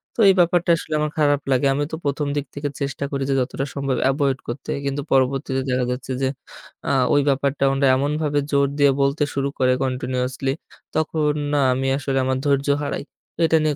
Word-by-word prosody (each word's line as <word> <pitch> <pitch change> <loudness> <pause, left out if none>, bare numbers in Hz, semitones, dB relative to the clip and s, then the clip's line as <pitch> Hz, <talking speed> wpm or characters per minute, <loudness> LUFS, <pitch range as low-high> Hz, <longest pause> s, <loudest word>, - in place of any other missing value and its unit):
তো, - - -10
এই - - +7
ব্যাপারটা 175 0 +3
আসলে 155 - -6
আমার 150 0 -1
খারাপ 145 -1 +3
লাগে। 130 +1 +2
আমি 145 +2 0
তো - - -2
১ম 145 +1 -1
দিক 145 -1 -1
থেকে 145 0 -3
চেষ্টা 140 0 -3
করি 140 -1 -1
যে - - +2
যতটা 135 +2 -2
সম্ভব 140 -2 -1
এভয়েড 135 -1 0
করতে। 120 +3 -5
কিন্তু 140 +1 -1
পরবর্তীতে 135 0 +1
দেখা 125 0 +1
যাচ্ছে 125 +1 -5
যে, 135 - +2 0.6
আ - - +2 0.2
ওই 145 - +5
ব্যাপারটা 140 0 0
ওনারা 135 0 +2
এমনভাবে 145 +2 0
জোর 140 -1 +3
দিয়ে 140 -1 +6
বলতে 140 +2 +2
শুরু 140 0 0
করে 130 -1 +4
কন্টিনিউয়াসলি, 130 +1 -2 0.4
তখন 155 -1 +1 0.2
না 145 - +3
আমি 135 +1 -1
আসলে 135 -1 -2
আমার 130 0 0
ধৈর্য 140 0 +1 0.2
হারাই। 140 - -3 0.4
এটা 160 0 +4
নিয়ে 155 -1 +1
140 Hz, 190 wpm, -22 LUFS, 135-145 Hz, 0.6 s, এই